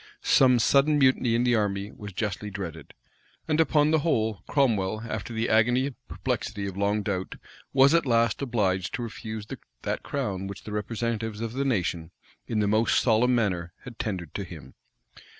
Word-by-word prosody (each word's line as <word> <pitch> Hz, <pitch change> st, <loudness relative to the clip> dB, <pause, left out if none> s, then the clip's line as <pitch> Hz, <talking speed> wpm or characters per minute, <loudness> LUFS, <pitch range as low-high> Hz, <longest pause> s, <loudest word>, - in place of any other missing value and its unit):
Some 125 Hz, -2 st, +5 dB
sudden 140 Hz, +6 st, +4 dB
mutiny 130 Hz, -4 st, +3 dB
in 120 Hz, -, +2 dB
the 125 Hz, -1 st, +3 dB
army 100 Hz, -2 st, 0 dB
was 105 Hz, -1 st, -9 dB
justly 105 Hz, +1 st, -3 dB
dreaded. 85 Hz, -7 st, -7 dB, 0.5 s
And 155 Hz, 0 st, +1 dB
upon 155 Hz, -1 st, +3 dB
the 160 Hz, -, +4 dB
whole, 110 Hz, -, 0 dB
Cromwell, 110 Hz, -6 st, +1 dB
after 110 Hz, +1 st, -5 dB
the 115 Hz, 0 st, -1 dB
agony 120 Hz, +4 st, +3 dB
and 140 Hz, -3 st, -5 dB
perplexity 105 Hz, +3 st, -3 dB
of 95 Hz, -2 st, -5 dB
long 100 Hz, +1 st, 0 dB
doubt, 95 Hz, -3 st, -3 dB, 0.4 s
was 135 Hz, +2 st, +5 dB
at 170 Hz, -4 st, +3 dB
last 115 Hz, -1 st, +2 dB
obliged 100 Hz, -8 st, 0 dB
to 120 Hz, -, -4 dB
refuse 110 Hz, -2 st, -6 dB, 0.4 s
that -, -, -2 dB
crown 100 Hz, -9 st, -3 dB
which 100 Hz, 0 st, -8 dB
the 105 Hz, -, -8 dB
representatives 110 Hz, +1 st, -3 dB
of 115 Hz, 0 st, -4 dB
the 135 Hz, +2 st, -1 dB
nation, 90 Hz, -9 st, -1 dB, 0.4 s
in 110 Hz, -2 st, 0 dB
the 105 Hz, -, +1 dB
most 110 Hz, +3 st, +3 dB
solemn 125 Hz, +2 st, +3 dB
manner, 90 Hz, -7 st, -1 dB
had 125 Hz, -3 st, -11 dB
tendered 90 Hz, -7 st, -4 dB
to 100 Hz, -, -3 dB
him. 80 Hz, -8 st, -11 dB
110 Hz, 175 wpm, -26 LUFS, 100-125 Hz, 0.5 s, Some